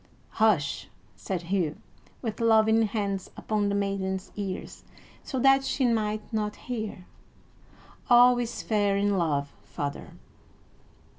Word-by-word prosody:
"Hush!" 195 -11 +2 0.3
said 180 -3 -4
Hugh, 170 -4 -1 0.5
with 225 -1 -3
loving 220 0 +4
hands 200 -2 -3
upon 210 -2 0
the 200 - 0
maiden's 195 -1 -2
ears 195 -3 -5 0.4
so 265 - -4
that 270 +1 +5
she 270 0 0
might 215 -2 -1
not 210 -1 -1
hear. 215 -7 -6 1.0
"All 245 0 +7
is 240 -1 -4
fair 205 -2 +1
in 200 0 +1
love, 145 -5 0
father!" 145 -1 -6
210 Hz, 120 wpm, -27 LUFS, 190-225 Hz, 1.0 s, All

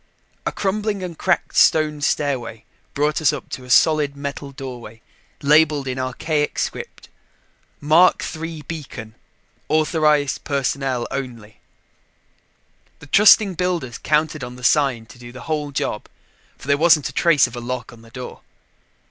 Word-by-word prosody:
A - - 0
crumbling 205 0 -2
and 175 -2 -6
cracked 180 +2 -1
stone 155 -2 +3
stairway 130 -7 -2 0.3
brought 150 +2 0
us 150 - +4
up 150 - -7
to 130 - -7
a - - -14
solid 150 +2 +3
metal 140 0 -5
doorway 125 -4 -9 0.4
labeled 150 -1 +3
in 130 0 -3
archaic 145 +4 -2
script - - -5 0.7
MARK 160 +5 +4
III 160 -1 -6
BEACON 135 -8 -8 0.6
AUTHORIZED 150 -2 +2
PERSONNEL 135 -3 -1
ONLY. 115 -6 -6 1.4
The - - -14
trusting 200 +4 +6
builders 175 -9 -2
counted 155 -1 0
on 125 0 -7
the 125 - -13
sign 130 -5 +2
to 110 +2 -16
do 120 0 -11
the 125 - -11
whole 150 -2 -3
job, 105 -5 -3 0.5
for - - -13
there 140 0 +2
wasn't 160 -3 +4
a - - -11
trace 160 -2 +4
of 125 - -7
a - - -5
lock 125 0 -5
on 115 - -15
the 115 - -17
door. 125 +2 -9
145 Hz, 150 wpm, -21 LUFS, 125-155 Hz, 1.4 s, trusting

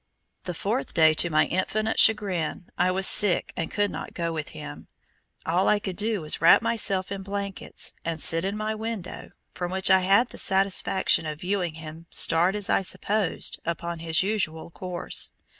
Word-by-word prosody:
The 180 - -5
fourth 220 +10 -3
day 160 -1 +5
to 170 +2 +1
my 155 -1 +3
infinite 215 +6 -1
chagrin, 190 -6 +1
I 180 +1 +1
was 190 +1 +2
sick 205 -2 +4
and 165 - -3
could 205 0 -1
not - - -8
go 170 -1 -2
with 155 -2 -5
him. - - -10 0.6
All 175 +4 +1
I 210 - +4
could 195 -3 -5
do 210 -1 -1
was 155 0 -1
to - - -1
wrap 165 +7 +6
myself 200 -5 0
in 200 -1 -4
blankets 200 0 -4
and 165 -1 -4
sit 165 +2 +2
in 195 +2 -2
my 215 0 -2
window 220 -4 -6 0.2
from 175 -1 -4
which 190 0 +2
I 190 - +6
had 200 +6 +3
the - - -6
satisfaction 190 -3 +2
of 150 -1 -6
viewing 180 -3 -2
him 160 +1 -10
start 175 +4 +3
as 205 -1 -1
I - - +2
supposed 200 +1 -1
upon 170 0 -4
his 165 +1 +1
usual 175 -6 -2
course. 180 0 -3
185 Hz, 185 wpm, -25 LUFS, 165-205 Hz, 0.6 s, wrap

